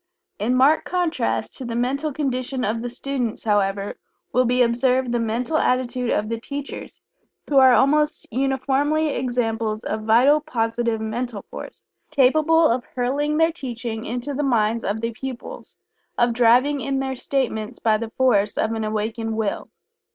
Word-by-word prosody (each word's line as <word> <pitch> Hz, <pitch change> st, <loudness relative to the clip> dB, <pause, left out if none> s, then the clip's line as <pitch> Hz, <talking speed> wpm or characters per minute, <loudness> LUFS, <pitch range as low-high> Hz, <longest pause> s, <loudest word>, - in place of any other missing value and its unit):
In 230 Hz, +5 st, +1 dB
marked 280 Hz, +5 st, +4 dB
contrast 355 Hz, -2 st, -1 dB
to -, -, -5 dB
the 235 Hz, -2 st, -4 dB
mental 275 Hz, +6 st, -1 dB
condition 260 Hz, -2 st, -2 dB
of 225 Hz, +2 st, -1 dB
the 245 Hz, -, -4 dB
students, 250 Hz, -2 st, -3 dB
however, 200 Hz, -2 st, 0 dB, 0.3 s
will 255 Hz, +1 st, +3 dB
be 250 Hz, +1 st, +3 dB
observed 250 Hz, +1 st, +1 dB
the 240 Hz, -, +1 dB
mental 240 Hz, +7 st, 0 dB
attitude 250 Hz, -1 st, 0 dB
of 210 Hz, -, 0 dB
the 230 Hz, 0 st, -3 dB
teachers, 280 Hz, +4 st, -7 dB, 0.5 s
who 280 Hz, -2 st, +4 dB
are 260 Hz, -1 st, +7 dB
almost 300 Hz, +4 st, +2 dB
uniformly 275 Hz, +4 st, +1 dB
examples 230 Hz, -4 st, -1 dB
of 215 Hz, -, -3 dB
vital, 245 Hz, +7 st, +5 dB
positive, 235 Hz, -5 st, -1 dB
mental 220 Hz, 0 st, -4 dB
force, -, -, -9 dB, 0.3 s
capable 310 Hz, +3 st, +4 dB
of 240 Hz, -1 st, 0 dB
hurling 285 Hz, +5 st, 0 dB
their 325 Hz, +1 st, +4 dB
teaching 235 Hz, -7 st, -5 dB
into 245 Hz, +5 st, -4 dB
the 285 Hz, -, -2 dB
minds 230 Hz, -4 st, +1 dB
of 210 Hz, +3 st, -2 dB
the 230 Hz, 0 st, -1 dB
pupils 255 Hz, +1 st, -8 dB, 0.4 s
of 240 Hz, -1 st, +3 dB
driving 250 Hz, +4 st, +4 dB
in 275 Hz, +1 st, -1 dB
their 265 Hz, 0 st, -2 dB
statements 245 Hz, -4 st, -2 dB
by 220 Hz, -1 st, +2 dB
the 225 Hz, +1 st, -5 dB
force 215 Hz, -5 st, +1 dB
of 220 Hz, -, +1 dB
an 225 Hz, -1 st, -2 dB
awakened 220 Hz, +1 st, -2 dB
Will. 215 Hz, -3 st, -2 dB
245 Hz, 160 wpm, -22 LUFS, 225-275 Hz, 0.5 s, are